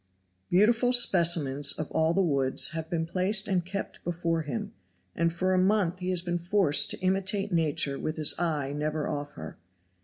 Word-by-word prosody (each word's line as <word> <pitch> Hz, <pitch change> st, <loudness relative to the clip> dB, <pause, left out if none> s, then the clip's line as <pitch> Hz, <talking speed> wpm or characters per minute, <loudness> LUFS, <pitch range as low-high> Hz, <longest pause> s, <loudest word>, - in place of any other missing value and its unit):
Beautiful 230 Hz, +6 st, +3 dB
specimens 165 Hz, -, +4 dB
of 155 Hz, -, -6 dB
all 160 Hz, +1 st, 0 dB
the 195 Hz, -, +2 dB
woods 135 Hz, -5 st, +1 dB
have 160 Hz, 0 st, -6 dB
been 165 Hz, -1 st, -2 dB
placed 195 Hz, +4 st, 0 dB
and 185 Hz, -3 st, 0 dB
kept 195 Hz, +3 st, -7 dB
before 170 Hz, -1 st, -2 dB
him, 140 Hz, -7 st, -6 dB, 0.4 s
and 170 Hz, +1 st, 0 dB
for 185 Hz, +3 st, -1 dB
a 185 Hz, -, +2 dB
month 185 Hz, -2 st, +1 dB
he 180 Hz, 0 st, -4 dB
has 180 Hz, -2 st, +1 dB
been 175 Hz, -1 st, -3 dB
forced 175 Hz, -3 st, +2 dB
to -, -, -4 dB
imitate 195 Hz, +2 st, -1 dB
nature 150 Hz, -4 st, 0 dB
with 155 Hz, -, -4 dB
his 155 Hz, -2 st, +4 dB
eye 150 Hz, -5 st, -2 dB
never 150 Hz, 0 st, -3 dB
off 145 Hz, 0 st, -5 dB
her. 80 Hz, -1 st, -10 dB
170 Hz, 180 wpm, -27 LUFS, 155-185 Hz, 0.4 s, specimens